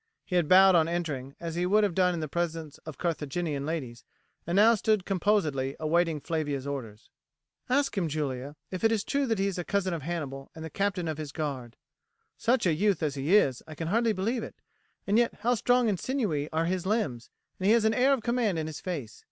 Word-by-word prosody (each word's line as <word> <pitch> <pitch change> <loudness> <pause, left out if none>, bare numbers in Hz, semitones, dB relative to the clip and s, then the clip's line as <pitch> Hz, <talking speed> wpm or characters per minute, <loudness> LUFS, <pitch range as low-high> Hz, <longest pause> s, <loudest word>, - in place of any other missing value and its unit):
He 180 - -3
had 175 -4 +3
bowed 190 +1 +8
on 165 -2 +4
entering, 150 -6 -3
as 170 -1 -5
he 175 +2 0
would 210 +3 +4
have 200 -4 +1
done 180 0 +2
in 165 - -3
the 155 - -3
presence 165 -1 -3
of 155 -4 -7
Carthaginian 150 -3 -2
ladies, 130 -8 -4 0.4
and 170 - -1
now 220 +4 +7
stood 215 -3 +1
composedly 165 -9 0
awaiting 165 0 +1
Flavia's 145 -4 -2
orders. 120 -6 -6 0.6
"Ask 275 +1 +1
him, 185 -5 0
Julia, 145 -2 -3 0.2
if 185 +1 -5
it 225 - +4
is 220 -2 +1
true 280 -1 0
that 225 -2 +1
he 195 - +1
is 195 -2 -2
a - - -2
cousin 190 -1 -1
of 165 - -3
Hannibal 140 -4 -5
and 160 0 -7
the 160 - -8
captain 195 -4 -1
of 155 -1 -3
his 150 -2 -5
guard. 135 -6 -4 0.6
Such 245 -1 +1
a 170 - +3
youth 195 +1 +1
as 150 -2 0
he 145 +7 +1
is, 135 - +3
I 155 - -9
can 160 +1 -4
hardly 230 +3 +2
believe 220 +5 -1
it; - - -8 0.5
and 205 +3 +3
yet 240 - +1
how 240 +3 +2
strong 245 +1 +2
and 200 -5 0
sinewy 195 - -1
are 160 +1 0
his 185 +1 -2
limbs, 155 - -1 0.3
and 190 - 0
he 215 - +6
has 230 -2 +3
an 220 - +3
air 255 +4 +3
of 265 -5 +1
command 235 -6 +1
in 160 - -2
his 155 -1 -6
face. 145 - -5
170 Hz, 225 wpm, -28 LUFS, 150-205 Hz, 0.6 s, bowed